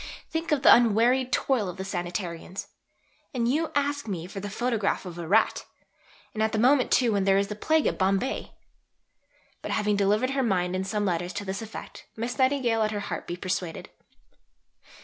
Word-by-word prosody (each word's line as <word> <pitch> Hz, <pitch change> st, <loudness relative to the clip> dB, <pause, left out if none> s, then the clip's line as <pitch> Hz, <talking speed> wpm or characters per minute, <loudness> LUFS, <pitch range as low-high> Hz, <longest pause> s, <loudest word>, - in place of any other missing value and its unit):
Think 325 Hz, +1 st, -2 dB
of 290 Hz, -2 st, +1 dB
the -, -, +9 dB
unwearied 245 Hz, +3 st, +3 dB
toil 240 Hz, -7 st, +1 dB
of 180 Hz, -, -8 dB
the 190 Hz, -, -4 dB
Sanitarians! 175 Hz, -1 st, -4 dB, 0.7 s
And 235 Hz, -2 st, +1 dB
you 310 Hz, +6 st, 0 dB
ask 285 Hz, -2 st, 0 dB
me 175 Hz, -5 st, -4 dB
for 195 Hz, +2 st, -7 dB
the 205 Hz, +1 st, -5 dB
photograph 220 Hz, -2 st, -1 dB
of 175 Hz, -1 st, -7 dB
a 170 Hz, -, -5 dB
rat! 215 Hz, +6 st, +3 dB, 0.7 s
and 215 Hz, -, -3 dB
at 220 Hz, +1 st, +1 dB
the -, -, +1 dB
moment 255 Hz, +3 st, +4 dB
too 245 Hz, -3 st, +3 dB
when 200 Hz, -1 st, +1 dB
there 195 Hz, 0 st, +4 dB
is 200 Hz, 0 st, 0 dB
the 210 Hz, -, -4 dB
Plague 315 Hz, +8 st, +1 dB
at -, -, 0 dB
Bombay!" 195 Hz, +7 st, 0 dB, 1.1 s
But -, -, -6 dB
having 210 Hz, -1 st, +1 dB
delivered 210 Hz, +6 st, +2 dB
her 270 Hz, 0 st, 0 dB
mind 185 Hz, -6 st, 0 dB
in 190 Hz, +1 st, -2 dB
some 205 Hz, +1 st, -1 dB
letters 175 Hz, -1 st, -1 dB
to 205 Hz, -, -5 dB
this 195 Hz, +2 st, -4 dB
effect, 225 Hz, 0 st, -9 dB
Miss 235 Hz, +4 st, -4 dB
Nightingale 260 Hz, -4 st, +2 dB
let 215 Hz, -1 st, +2 dB
her 210 Hz, -1 st, -3 dB
heart 205 Hz, -, -5 dB
be 175 Hz, -, -3 dB
persuaded. 180 Hz, -2 st, -4 dB
210 Hz, 190 wpm, -27 LUFS, 190-250 Hz, 1.1 s, the